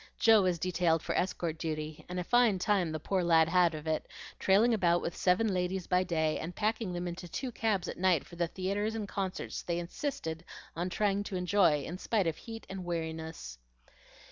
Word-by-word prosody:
Joe 225 -2 +6
was 180 -2 +1
detailed 170 -2 +1
for - - -2
escort 170 -3 -1
duty; 155 -1 -4
and 180 0 -3
a - - -1
fine 240 0 +4
time 185 -3 +1
the 155 - -3
poor 185 +4 0
lad 165 -2 +5
had 175 -1 +3
of 155 0 -7
it, 160 -1 -1 0.3
trailing 210 +5 +4
about 175 -5 +3
with 170 - -3
seven 190 +3 +2
ladies 180 0 -1
by 180 0 +2
day 160 -3 0
and 170 +3 -6
packing 220 -2 -1
them 175 0 -3
into 175 +1 -6
two 250 - -4
cabs 215 -5 0
at - - -6
night 180 -5 +3
for - - -13
the 170 0 0
theatres 200 +5 -2
and 215 -2 -3
concerts 195 -2 -4
they 170 -1 -2
insisted 175 - -4 0.3
on 175 +2 -2
trying 200 +1 +1
to 195 - -5
enjoy 180 -5 +3
in 175 +5 -6
spite 210 -3 +1
of 165 -1 -1
heat 225 -1 -9
and 190 -1 -6
weariness. 160 - -5
180 Hz, 200 wpm, -31 LUFS, 165-200 Hz, 0.3 s, Joe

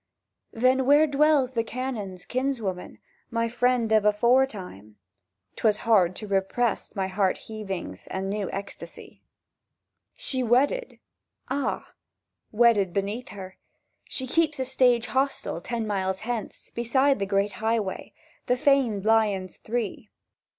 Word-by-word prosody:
—"Then, 255 +2 +2
where 290 +2 +6
dwells 290 -2 +3
the 230 -3 0
Canon's 225 -7 -5
kinswoman, 240 -8 -3 0.3
My 230 -1 0
friend 240 -1 +1
of 215 -1 +4
aforetime?"— 210 - +1 0.6
('Twas 215 -2 +2
hard 190 -6 +4
to 215 - -6
repress 200 +5 -1
my 190 -2 -1
heart 190 0 +1
heavings 195 - -6
And 190 0 -3
new 200 -1 -2
ecstasy.) 200 0 -8 0.9
"She 260 -2 -1
wedded."—"Ah!"—"Wedded 240 - -1
beneath 205 +5 -2
her— 190 -2 -9 0.5
She 260 - -2
keeps 310 +3 +1
the 260 - -1
stage 250 -3 +3
hostel 265 -10 -1
Ten 235 +1 -3
miles 190 -2 -1
hence, 230 -1 -5
beside 265 +3 +2
the 195 - -1
great 200 +1 +1
Highway— 220 -3 -1 0.3
The 250 - +2
famed 260 -8 +2
Lions 210 -4 +2
Three. 225 0 -4
225 Hz, 115 wpm, -26 LUFS, 195-255 Hz, 0.9 s, where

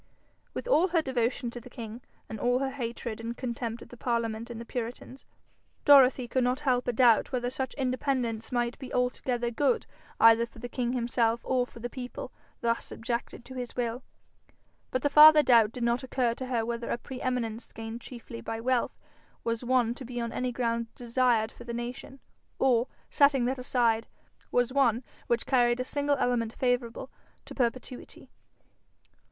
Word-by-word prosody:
With - - -4
all 370 -7 +4
her 335 -3 +1
devotion 245 -2 -1
to 240 - -8
the 250 - -12
king, 230 0 -8 0.3
and 220 - -6
all 245 +2 +2
her 265 0 -1
hatred 235 -4 -5
and 230 +1 -5
contempt 235 -2 -4
of - - -16
the 245 - -12
parliament 230 -1 -2
and 235 -1 -6
the 235 - -7
puritans, 245 +3 -6 0.6
Dorothy 265 -3 +7
could 255 +1 +1
not 250 +3 0
help 250 -3 +1
a - - +3
doubt 240 -1 +4
whether 245 -1 -1
such 260 0 -3
independence 255 -4 -1
might 240 -1 -1
be 265 - -8
altogether 250 -1 0
good 290 - +1 0.3
either 230 +1 +6
for 230 - -19
the 245 +2 -6
king 245 0 -2
himself 235 -1 +1
or 250 -1 +1
the 235 +1 -5
people 250 0 -7 0.3
thus 230 0 0
subjected 235 +1 -4
to 260 - -10
his 250 -2 -6
will. 240 0 -2 0.9
But 255 - -2
the 290 - +3
farther 305 0 +9
doubt 230 -5 +5
did 245 0 -5
not 235 +1 +1
occur 250 -2 0
to 260 +2 -6
her 235 -3 0
whether 235 0 -3
a - - 0
pre 255 +1 -8
eminence 235 -3 -2
gained 225 +1 -7
chiefly 235 -1 -9
by 225 0 -4
wealth 250 +1 0 0.5
was 230 +1 -2
one 245 -2 +2
to 260 - -9
be 245 0 -5
on 235 -1 -2
any 250 +1 -2
grounds 235 -1 -1
desired 240 -2 +1
for - - -12
the 235 -1 -5
nation, 245 +3 -6 0.4
or, 250 -2 +3 0.2
setting 280 -3 +4
that 260 +1 -1
aside, 235 -3 +1 0.4
was 245 +1 +1
one 255 -3 +3 0.2
which 235 -1 +1
carried 240 -2 +3
a - - 0
single 285 +2 0
element 235 -3 0
favourable 245 -2 -1 0.3
to - - -9
perpetuity. 250 0 -4
245 Hz, 180 wpm, -29 LUFS, 235-255 Hz, 0.9 s, farther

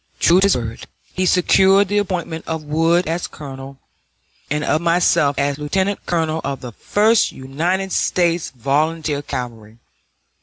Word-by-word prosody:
True 175 +2 +5
to 195 - +4
his 200 - +3
word, 115 -2 -6 0.3
he 185 0 0
secured 190 +3 +4
the 205 +2 +1
appointment 175 -5 -4
of 160 -1 -3
Wood 165 +4 +1
as 165 +2 -2
colonel 135 -1 -10 0.7
and 150 +1 -1
of 155 - +1
myself 170 -4 +2
as 140 +1 -1
lieutenant 190 +7 -2
colonel 160 -2 -1
of 140 0 -4
the 125 - -7
First 215 - +2
United 170 +9 -2
States 175 -2 +1
Volunteer 145 +4 -1
Cavalry. 115 -5 -7
160 Hz, 145 wpm, -19 LUFS, 140-180 Hz, 0.7 s, True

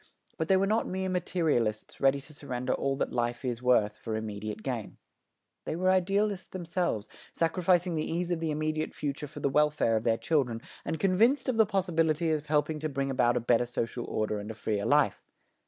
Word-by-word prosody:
But 160 - -2
they 190 - +5
were 195 - +2
not 215 +3 +1
mere 190 0 -2
materialists 155 -12 -1
ready 135 +1 +4
to 150 +2 -11
surrender 130 -4 -3
all 135 0 0
that - - -2
life 120 +1 -1
is 120 -1 -2
worth 110 -4 +2
for 110 -2 -4
immediate 110 0 -5
gain. 120 -6 -4 0.7
They - - -2
were 185 +2 +2
idealists 195 +2 +1
themselves, 175 - -2 0.3
sacrificing 175 +1 +2
the 155 -1 -2
ease 175 +1 -1
of 175 - 0
the 165 -1 -1
immediate 155 +1 -2
future 145 0 -3
for 145 +1 -10
the - - +2
welfare 150 -5 +2
of 110 - 0
their 115 -1 +2
children, 130 -8 0 0.2
and 160 - -3
convinced 225 +9 +3
of 245 - 0
the 220 -2 +5
possibility 165 -5 +1
of 150 -1 -1
helping 150 +1 +1
to 155 +1 -2
bring 135 -1 -2
about 125 -2 +2
a - - +2
better 120 +1 +2
social 120 0 -3
order 110 -1 -1
and 105 +1 -7
a 110 - -6
freer 105 -2 -2
life. - - +3
150 Hz, 200 wpm, -29 LUFS, 120-175 Hz, 0.7 s, they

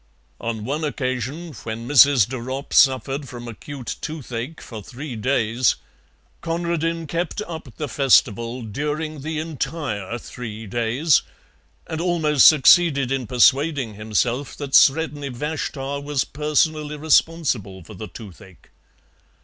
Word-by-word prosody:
On 110 -2 -4
one 145 +5 -2
occasion, 140 +3 -3
when 115 +1 -6
Mrs. 140 -5 +6
de 130 +1 -5
Ropp 130 +4 -6
suffered 135 +1 +3
from 120 -1 -8
acute 125 +3 -7
toothache 145 -2 -5
for 110 -3 -9
three 130 +5 -8
days, 115 +1 +1 0.7
Conradin 165 0 -2
kept 170 +6 -3
up 160 -6 -8
the 150 - -3
festival 120 -3 +2
during 150 +6 -4
the 155 +2 -4
entire 145 - -3
three 115 -2 -8
days, 120 - +2 0.6
and 160 0 -4
almost 160 -6 +4
succeeded 150 -2 +5
in 130 -3 -1
persuading 135 +1 +3
himself 110 +6 -2
that 140 -2 -6
Sredni 145 -1 +4
Vashtar 140 +1 -4
was 145 -2 0
personally 150 0 0
responsible 145 - +1
for 105 - -12
the 105 +2 -7
toothache. 95 -1 -13
135 Hz, 120 wpm, -22 LUFS, 120-155 Hz, 0.7 s, Mrs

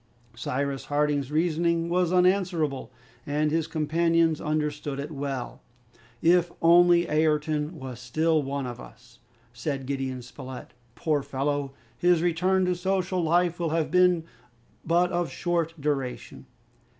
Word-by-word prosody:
Cyrus 135 +1 -3
Harding's 145 -1 0
reasoning 165 +1 +1
was 175 0 +1
unanswerable, 180 -7 +1 0.3
and 150 +2 0
his 160 0 0
companions 165 +1 +1
understood 150 -2 -2
it 145 +3 -5
well. 140 -3 -5 0.6
"If 175 +1 +4
only 175 +1 +5
Ayrton 150 +1 0
was 130 -4 -7
still 155 +6 +1
one 140 0 -3
of 120 -1 -6
us!" 120 +2 -15 0.3
said 135 +2 -4
Gideon 130 -2 -3
Spilett. 125 +1 -10 0.2
"Poor 150 -3 0
fellow! 140 +1 -2 0.3
his 175 -1 +3
return 185 +2 +2
to 180 - +1
social 185 0 -1
life 175 +1 +2
will 170 -2 0
have 160 -1 -1
been 180 -2 +4 0.6
but 175 +2 +2
of 175 -3 -1
short 165 +4 -2
duration." 140 -3 -3
155 Hz, 125 wpm, -26 LUFS, 140-175 Hz, 0.6 s, only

